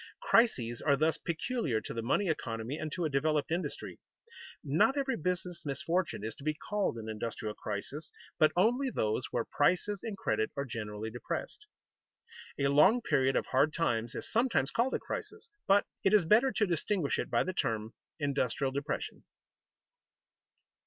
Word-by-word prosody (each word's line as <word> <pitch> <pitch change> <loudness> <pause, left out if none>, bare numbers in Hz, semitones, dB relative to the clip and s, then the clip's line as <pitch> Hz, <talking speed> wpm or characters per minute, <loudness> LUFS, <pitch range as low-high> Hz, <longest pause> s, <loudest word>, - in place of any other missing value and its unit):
Crises 220 - +2
are 145 -2 +3
thus 155 +2 +2
peculiar 170 - -1
to - - -7
the 115 - -3
money 160 - +1
economy 115 -5 -2
and 155 -1 -4
to 175 0 -2
a - - +1
developed 150 +2 +1
industry. 175 +2 -3 0.6
Not 160 - +3
every 270 -2 0
business 180 -1 -3
misfortune 170 - -1
is 110 0 -3
to - - -12
be 155 0 0
called 205 - -2
an 110 -1 -6
industrial 110 0 -4
crisis, 110 +11 -5 0.3
but 155 - +6
only 245 +9 +3
those 110 - -1
where 120 - -1
prices 185 +6 +1
and 220 -4 -5
credit 110 - 0
are 140 - -1
generally 110 -2 -5
depressed. 420 - -5 0.9
A 140 -1 +2
long 170 - +5
period 135 0 +2
of - - +1
hard 145 +4 +3
times 120 -8 0
is - - -4
sometimes 230 - +1
called 245 +3 +1
a - - -1
crisis, 460 - -6 0.2
but 200 +1 +5 0.2
it 195 +2 +5
is 200 -5 +4
better 230 +9 +5
to 215 - +2
distinguish 175 -2 0
it - - -2
by - - +2
the 185 - -3
term 110 -7 -1 0.3
industrial 140 -2 0
depression. 140 +3 -4
155 Hz, 165 wpm, -31 LUFS, 120-195 Hz, 0.9 s, but